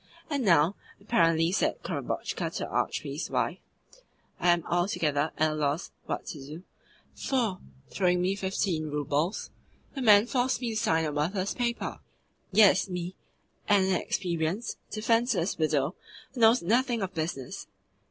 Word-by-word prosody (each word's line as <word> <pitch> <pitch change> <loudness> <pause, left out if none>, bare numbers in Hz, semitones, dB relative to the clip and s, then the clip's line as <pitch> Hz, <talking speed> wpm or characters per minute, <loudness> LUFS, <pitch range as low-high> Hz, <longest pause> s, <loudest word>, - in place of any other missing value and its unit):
'And 280 -3 0
now,' 170 -1 +4 0.2
apparently 165 -6 +2
said 195 - 0
Korobotchka - - -3
to - - -3
the - - -3
Archpriest's - - -2
wife, - - -1 0.8
'I 175 - +2
am 175 -1 +4
altogether 160 -4 0
at 155 0 +2
a - - -2
loss 150 +2 -1 0.2
what - - -3
to 145 -4 -7
do, 155 +6 -9 0.5
for, 230 -9 -1 0.3
throwing 180 -2 +2
me 185 +2 +1
fifteen 190 -4 -1
roubles, 150 +5 -1 0.4
the 275 - -5
man 210 -3 +7
forced 250 0 0
me 240 -2 -2
to - - -4
sign 165 -8 +2
a 150 - -1
worthless 185 +7 -1
paper 240 -1 -2 0.5
yes, 200 -1 +5
me, 180 0 -4 0.5
an 205 -2 +5
inexperienced, 180 +1 -1
defenceless 220 -4 +1
widow 155 -1 +1 0.4
who 255 - -7
knows 225 -2 +6
nothing 235 +3 +1
of 190 0 -4
business. 155 -6 -4
185 Hz, 145 wpm, -28 LUFS, 160-220 Hz, 0.8 s, man